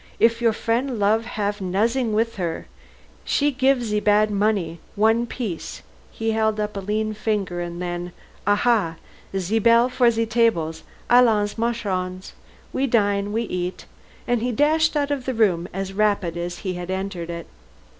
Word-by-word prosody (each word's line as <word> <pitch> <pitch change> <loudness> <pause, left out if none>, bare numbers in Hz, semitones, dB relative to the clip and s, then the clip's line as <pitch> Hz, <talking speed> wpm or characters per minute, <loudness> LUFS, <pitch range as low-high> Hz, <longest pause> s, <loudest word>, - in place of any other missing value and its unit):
If 230 +1 +3
your 230 -1 +4
frien' 235 +3 -1
love, 215 +2 +2
haf 205 -3 -3
nozzin' 220 +6 0
wis 230 +1 0
her. 170 -3 -3 0.6
She 290 0 +1
gif 265 -1 +2
ze 210 -2 0
bad 210 0 +3
money, 200 -5 0 0.2
one 225 +3 +3
piece 220 -9 -5
" - - -29
he 225 0 +1
held 220 -1 +1
up 210 0 -2
a - - -2
lean 215 +2 -1
finger, 205 -5 -2
and 175 0 -5
then, 175 0 -4 0.4
"Aha! 205 -4 +2 0.4
ze 190 +4 0
bell 235 +2 +5
for 245 -1 +3
ze 230 0 0
tables. 220 -9 +1 0.3
Allons, 225 -4 +4
marchons. 190 -6 -2 0.4
We 270 +1 +1
dine 205 -4 +1
we 225 +2 0
eat," 180 -4 -4 0.4
and 240 -2 +1
he 245 +1 0
dashed 310 +5 +2
out 290 0 0
of 275 -3 -2
the 260 - -2
room 185 -6 +2
as 195 +1 -4
rapidly 200 -5 0
as 175 0 -4
he 185 - -1
had 180 0 -6
entered 190 -2 -3
it. 170 0 -5
215 Hz, 165 wpm, -23 LUFS, 185-230 Hz, 0.6 s, bell